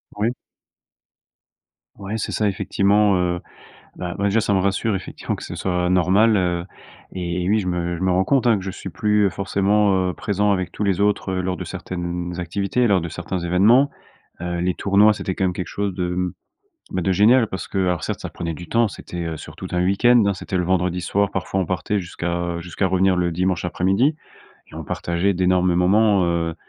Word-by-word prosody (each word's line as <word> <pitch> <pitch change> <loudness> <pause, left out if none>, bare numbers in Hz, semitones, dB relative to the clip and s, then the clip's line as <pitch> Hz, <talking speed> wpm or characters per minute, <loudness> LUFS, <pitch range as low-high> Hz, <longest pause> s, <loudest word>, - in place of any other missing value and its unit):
Oui. 105 +3 +1 1.7
Ouais, 100 +2 -4
c'est - - -3
ça 105 - 0
effectivement, 100 0 +2
heu 90 -1 -1 0.6
bah, 90 0 -5
ouais, 100 - -1
déjà 110 +3 +2
ça 100 -2 0
me 95 - +3
rassure 100 +3 0
effectivement - - -5
que - - -9
ce - - -7
soit 90 -1 -1
normal, 95 +5 +4
heu 90 -2 0 0.5
et 90 -1 -3
oui, 110 - +3
je 90 - -5
me 85 -1 -1
je - - -9
me 95 - +2
rends 95 +1 +2
compte, 135 -3 +2
hein, 115 -3 +5
que 95 - -8
je 95 - -3
suis 95 - -8
plus 105 +1 +2
forcément, 100 +1 +1
heu, - - -6
présent 105 0 0
avec 95 -3 -2
tous - - -5
les 100 -2 +1
autres, 100 -2 +1
heu, 95 - -1
lors 90 0 -2
de 95 - -5
certaines 90 -1 -5
activités, 100 +7 0
lors 100 -4 +3
de 85 - -4
certains 90 +3 -4
événements, 105 +11 +4 0.5
heu, 85 0 -3
les 90 0 0
tournois, 100 +2 +4
c'était 95 -2 -4
quand 95 - -1
même 90 - +1
quelque 90 -1 -4
chose 100 +3 -3
de, 90 -1 -2
mmh, 90 0 -2 0.6
bah, 95 - -1
de 95 +2 +1
génial 115 +6 +5
parce 95 - -6
que - - -5
alors 90 -4 0
certes, - - -3
ça - - -5
prenait 85 -1 -5
du 85 +1 -9
temps. 115 -1 +2
C'était, 90 -3 -7
heu, 80 -2 -4
sur - - -11
tout - - -7
un 90 0 +1
weekend, 115 +5 +4
hein. 100 - +2
C'était 95 0 -4
le 90 - +1
vendredi 90 0 0
soir, 100 +4 0
parfois, 95 +1 -2
on 95 - 0
partait 95 +3 -1
jusqu'à, 85 -1 -4 0.2
heu, 85 - -5
jusqu'à 90 +3 -2
revenir 95 0 +2
le 90 -1 0
dimanche 90 +1 -1
après-midi 95 - +1 0.6
et - - -14
on - - -6
partageait 85 +4 -1
d'énormes 90 0 +2
moments, 100 +2 +3
heu, 85 -1 -1
95 Hz, 215 wpm, -21 LUFS, 90-100 Hz, 1.7 s, hein